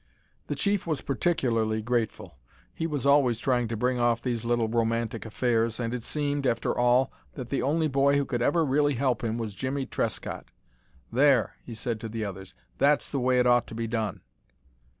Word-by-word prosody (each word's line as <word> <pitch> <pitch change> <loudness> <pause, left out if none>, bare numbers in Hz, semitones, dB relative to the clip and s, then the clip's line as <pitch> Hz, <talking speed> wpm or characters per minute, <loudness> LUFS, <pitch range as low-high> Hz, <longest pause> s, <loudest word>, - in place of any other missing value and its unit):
The - - -2
chief 200 -3 0
was 155 -5 -1
particularly 115 -8 0
grateful. 115 - -2 0.3
He 165 - -2
was 145 -5 -3
always 140 -5 +4
trying 120 -1 +1
to 115 0 -3
bring 125 +2 0
off 120 -1 +2
these 120 -3 -2
little 120 -1 +1
romantic 115 0 -1
affairs, 115 0 0
and 115 -1 -2
it 125 - -3
seemed, 145 +1 -1
after 115 - 0
all, 125 +2 +3 0.2
that - - -6
the - - 0
only 155 +4 +1
boy 140 0 +3
who 140 - +1
could 120 -3 -2
ever 160 +6 +2
really 145 +1 +2
help 130 -1 0
him 115 0 -1
was 110 -3 -4
Jimmie 130 +5 -3
Trescott. - - -3 0.7
"There," 130 -2 +3
he 115 - -8
said 115 0 -3
to 115 - -6
the 110 0 -3
others, 95 -1 -8 0.2
"that's 145 +1 +3
the 140 - -1
way 125 0 +2
it 125 - +3
ought 120 -1 +4
to 115 - -9
be 115 0 -2
done." 110 -4 -2
120 Hz, 190 wpm, -27 LUFS, 115-140 Hz, 0.7 s, always